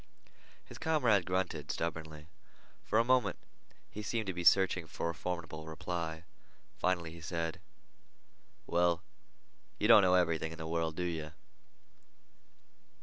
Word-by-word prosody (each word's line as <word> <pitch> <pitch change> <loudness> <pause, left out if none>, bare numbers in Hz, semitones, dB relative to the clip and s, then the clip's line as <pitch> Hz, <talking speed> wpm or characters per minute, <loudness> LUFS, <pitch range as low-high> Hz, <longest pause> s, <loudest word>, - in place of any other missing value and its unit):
His - - -11
comrade 120 - +2
grunted 90 -5 -1
stubbornly. 80 -2 -4 0.6
For 110 - 0
a 115 - +5
moment 125 +1 +2 0.5
he 105 - -6
seemed 110 +1 -2
to 95 - -2
be 90 0 -4
searching 90 -1 +4
for 85 +1 -3
a - - -9
formidable 85 -2 -5
reply. 80 0 -4 0.6
Finally 85 -3 0
he 85 0 -11
said: 85 0 -3 1.1
"Well, 85 -1 +2 0.7
you 105 - +1
don't 115 -2 +9
know 90 -1 +4
everything 80 -3 +1
in 80 - -8
the 80 - -6
world, 80 -1 -1
do 90 - -2
you?" 80 -3 -3
85 Hz, 135 wpm, -33 LUFS, 80-95 Hz, 1.1 s, don't